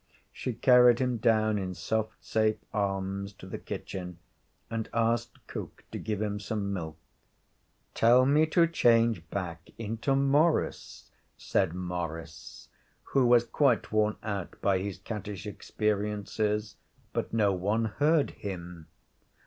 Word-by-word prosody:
She 125 - -3
carried 125 0 +6
him 125 -2 0
down, 110 -2 +2
in 90 -1 -4
soft, 110 +5 -3
safe 110 -1 +1 0.2
arms, 100 -1 -2
to 95 - -13
the 95 - -6
kitchen, 90 -2 -6 0.5
and 115 -1 -4
asked 115 0 0
cook - - -8
to - - -5
give 105 -2 -3
him 105 -1 -2
some 100 -1 -3
milk. 80 -4 -5 1.0
'Tell 120 +3 +5
me 150 +3 +4
to 170 +2 +4
change 115 - +3
back 85 -4 -5
into 115 +5 -1
Maurice,' 145 +4 +1 0.3
said 90 -3 0
Maurice 85 -3 -6 0.5
who 135 -3 +4
was 120 -1 +6
quite 125 0 +1
worn 110 0 +2
out 100 -4 -4
by 95 -2 +2
his 100 0 -4
cattish 100 -1 -6
experiences. 105 0 -2 0.4
But - - -2
no 105 -3 +2
one 105 +5 0
heard 145 +7 +2
him. 90 -4 -7
105 Hz, 130 wpm, -29 LUFS, 95-115 Hz, 1.0 s, carried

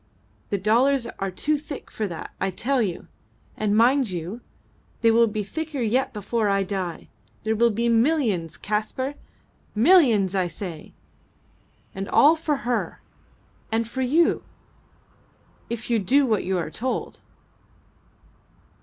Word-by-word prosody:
The 200 - 0
dollars 235 +6 +2
are 195 - -1
too 295 +11 0
thick 290 -1 -9
for 215 - -2
that, 170 -4 -7
I 195 - +1
tell 250 +8 0
you! 185 -6 -3 0.5
And 210 -1 0
mind 255 +1 +4
you, 180 +6 -5 0.6
they 230 -1 +5
will 230 +1 +5
be 210 -1 -3
thicker 315 +6 -5
yet 245 +4 +1
before 210 +1 -1
I 195 0 +2
die. 190 -3 -4 0.4
There 220 +1 0
will 235 +2 +4
be 230 +2 0
millions, 230 - +1
Kaspar! 215 +6 -2 0.6
Millions 230 - +5
I 185 -2 +1
say! 170 -2 -8 1.0
And 195 +1 -5
all 305 +3 +6
for 305 -5 -2
her 245 -1 -2 0.7
and 225 0 0
for 260 +3 -4
you, 310 +7 +2 1.3
if 235 0 -4
you 230 - +3
do 270 +9 +3
what 220 -5 0
you 190 0 0
are 165 -3 -3
told." 255 +8 -4
225 Hz, 135 wpm, -24 LUFS, 195-260 Hz, 1.3 s, all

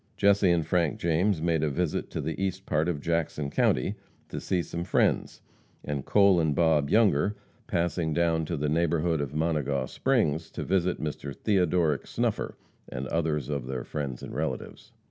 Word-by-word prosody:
Jesse 100 -1 +4
and 85 -2 +2
Frank 85 -1 +1
James 85 +1 +1
made 85 -2 +1
a 80 - +1
visit 80 +3 -1
to - - -4
the 80 +5 -3
east 95 0 -3
part 80 +3 +1
of 75 -5 -2
Jackson 80 -3 -1
county - - +2 0.4
to - - -4
see 90 -2 -1
some 85 +1 -4
friends, 90 - +1 0.4
and 70 -2 -3
Cole 100 0 +4
and 80 -3 +1
Bob 75 -3 +3
Younger, 105 -3 +3 0.3
passing 85 -1 0
down 80 0 +1
to 85 +1 -3
the 75 +1 -1
neighborhood 80 0 +1
of 70 0 -4
Monegaw 75 -4 0
Springs, 80 - 0
to - - -4
visit 90 -1 +1
Mr. 75 -2 -4
Theodoric 90 -7 +1
Snuffer - - -2 0.3
and 65 +2 -4
others 75 -4 0
of 70 -4 -3
their 65 -2 -3
friends 70 -5 -5
and - - -7
relatives. - - -4
80 Hz, 170 wpm, -28 LUFS, 75-90 Hz, 0.4 s, Jesse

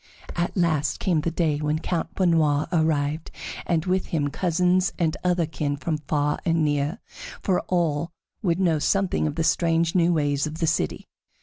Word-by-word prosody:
At 175 +3 -2
last 160 -4 +1
came 170 -5 +1
the 170 - 0
day 160 -3 0
when 150 0 0
Count 165 +1 -3
Benoît 160 -5 +2
arrived, 155 -2 0 0.4
and 165 -2 +1
with 185 0 0
him 145 -3 0
cousins 180 +3 +1
and 160 -3 +1
other 180 -2 +2
kin 150 -2 -3
from 155 +1 -2
far 150 0 0
and 165 -2 +2
near, 145 +4 0 0.5
for 185 -4 +2
all 170 -3 0 0.3
would 175 -4 +1
know 170 -5 +2
something 195 +1 +1
of 150 - -3
the 165 - 0
strange 165 0 +2
new 175 -1 +3
ways 145 -2 +1
in 155 - -6
the 165 - -1
city. 155 - -1
165 Hz, 175 wpm, -24 LUFS, 150-175 Hz, 0.5 s, new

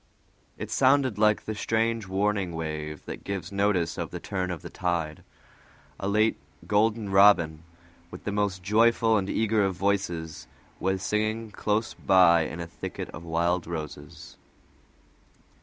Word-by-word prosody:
It - - -6
sounded 130 -4 +3
like 105 -1 +3
the 110 - -3
strange 115 0 -1
warning 95 -2 0
wave 75 -2 -5
that - - -7
gives 100 -1 -5
notice 100 -5 0
of 85 - -3
the 90 - -6
turn 95 0 -3
of 90 -3 -5
the - - -7
tide. 85 -4 -2 0.8
A 95 - -3
late 105 +2 +2 0.3
golden 105 0 +1
robin, 95 -6 +5 0.5
with 90 - -10
the 105 - -3
most 100 -2 -1
joyful 115 +2 +3
and 100 -2 0
eager 110 -1 +1
of 95 -1 0
voices, 85 -8 -2 0.3
was 95 0 -1
singing 110 +2 -1
close 105 +2 -1
by 85 -4 +5
in 80 - -6
a 85 - -4
thicket 85 - -7
of 80 - -9
wild 85 +1 0
roses. 75 -3 -7
95 Hz, 145 wpm, -27 LUFS, 85-105 Hz, 0.8 s, robin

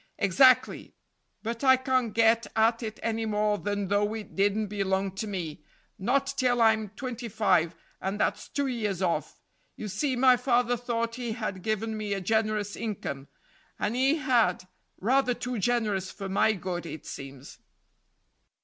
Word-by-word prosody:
"Exactly; 255 +6 +3 0.5
but 230 +3 -4
I 260 -1 +6
can't 255 -3 0
get 230 +1 +3
at 225 +2 +3
it 220 -2 -5
any 225 0 -1
more 210 -1 +1
than 205 -1 -2
though 205 +2 +1
it 220 -2 -8
didn't 205 +2 +2
belong 195 -1 -1
to 195 +4 -5
me 170 -7 -5 0.4
not 255 +8 +1
till 245 -1 +2
I'm 220 -2 +3
twenty 245 -1 -5
five, 180 -6 +2 0.3
and 195 +2 -3
that's - - -1
two 285 - -1
years 210 -8 -2
off. 175 -2 -1 0.4
You 215 - -6
see, 255 +7 -1
my 255 0 +5
father 245 -1 +2
thought 230 -1 -2
he 235 -2 -2
had 215 -5 -4
given 220 +2 -2
me 210 -1 -3
a - - -2
generous 215 +1 0
income, 160 -11 -5 0.5
and 220 - -1
he 265 +4 +3
had 235 - +1 0.3
rather 250 +3 +2
too 250 -1 -4
generous 210 -4 0
for 195 -2 -7
my 200 +3 +3
good, 180 -3 -4
it 160 - -8
seems." 135 -1 -9
220 Hz, 160 wpm, -28 LUFS, 195-245 Hz, 0.5 s, I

